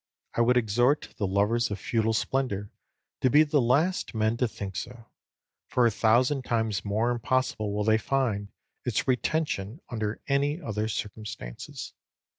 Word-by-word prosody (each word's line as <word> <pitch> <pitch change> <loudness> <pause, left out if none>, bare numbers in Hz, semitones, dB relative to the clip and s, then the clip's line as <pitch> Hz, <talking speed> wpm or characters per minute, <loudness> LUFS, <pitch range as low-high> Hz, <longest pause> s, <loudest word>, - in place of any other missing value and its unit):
I - - +1
would 125 +1 +4
exhort 120 +5 +2
the 100 - 0
lovers 105 +5 +2
of 100 - -3
feudal 115 +2 0
splendour 110 -5 -1 0.5
to 130 - +3
be 150 +5 +7
the 145 -2 +2
last 145 +7 +1
men 110 +1 +2
to 125 - +2
think 100 -4 -7
so; 115 +7 -6 0.6
for 125 - +3
a 115 - +4
thousand 125 +6 +3
times 110 -4 0
more 110 +4 +1
impossible 120 -3 0
will 105 +1 -1
they 110 +1 +3
find 115 -6 -1 0.3
its - - -1
retention 130 -3 0
under 110 -3 -3
any 140 +3 +1
other 110 - -2
circumstances. 105 - -6
115 Hz, 150 wpm, -28 LUFS, 105-130 Hz, 0.6 s, be